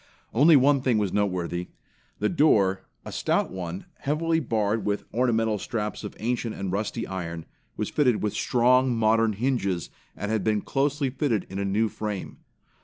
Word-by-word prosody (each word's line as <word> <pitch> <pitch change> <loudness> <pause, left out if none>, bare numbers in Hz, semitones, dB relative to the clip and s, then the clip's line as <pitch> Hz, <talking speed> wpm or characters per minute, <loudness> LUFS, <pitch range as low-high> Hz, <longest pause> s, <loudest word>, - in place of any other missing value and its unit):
Only 150 +7 +6
one 140 0 +5
thing 125 -4 +2
was 105 -3 0
noteworthy. 90 -3 -1 0.5
The - - +1
door, 105 - +3 0.2
a - - -6
stout - - 0
one 90 -1 -5
heavily 160 +3 0
barred 110 -5 0
with 105 0 -1
ornamental 115 -3 +1
straps 105 +1 -3
of 105 - -7
ancient 120 0 -2
and 95 -2 -4
rusty 105 +4 -2
iron, 85 -4 -5 0.3
was - - -2
fitted 125 -8 +2
with 105 - 0
strong, 125 +1 +3
modern 115 0 +3
hinges, 100 - -1 0.3
and 105 +2 -3
had 110 -3 0
been 105 -1 +1
closely 140 -1 0
fitted 125 -7 0
in 95 - -4
anew 100 +3 +1
frame. 105 -2 -5
110 Hz, 160 wpm, -26 LUFS, 100-125 Hz, 0.5 s, Only